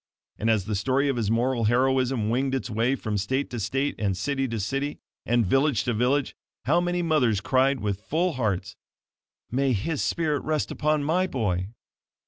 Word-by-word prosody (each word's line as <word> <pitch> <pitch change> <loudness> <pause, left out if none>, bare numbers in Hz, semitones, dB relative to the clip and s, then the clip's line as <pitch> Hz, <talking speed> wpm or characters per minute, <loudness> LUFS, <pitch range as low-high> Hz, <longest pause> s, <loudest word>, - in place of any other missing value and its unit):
And 110 - 0
as 110 -4 +2
the 105 - -3
story 130 +8 +1
of 135 - 0
his 110 -4 -1
moral 120 +1 +1
heroism 125 -1 +2
winged 135 +2 0
its 130 -2 -3
way 115 +5 +1
from 110 -5 -3
state 130 +8 -1
to 120 - -4
state, 135 +7 -1
and 100 -3 0
city 135 +1 -1
to 115 -2 -3
city, 135 +8 -2 0.3
and 120 -1 +3
village 135 +4 +2
to 120 - 0
village, 125 +5 +1 0.3
how 165 +7 +3
many 175 0 -1
mothers 130 - +2
cried 130 +2 +2
with 100 -1 -2
full 165 +9 0
hearts: 110 -8 -2 0.8
"May 135 +1 +1
his 140 +9 -1
spirit 155 -4 0
rest 155 -1 -1
upon 150 -1 0
my 180 +5 +1
boy!" 95 - -1
130 Hz, 180 wpm, -26 LUFS, 110-140 Hz, 0.8 s, and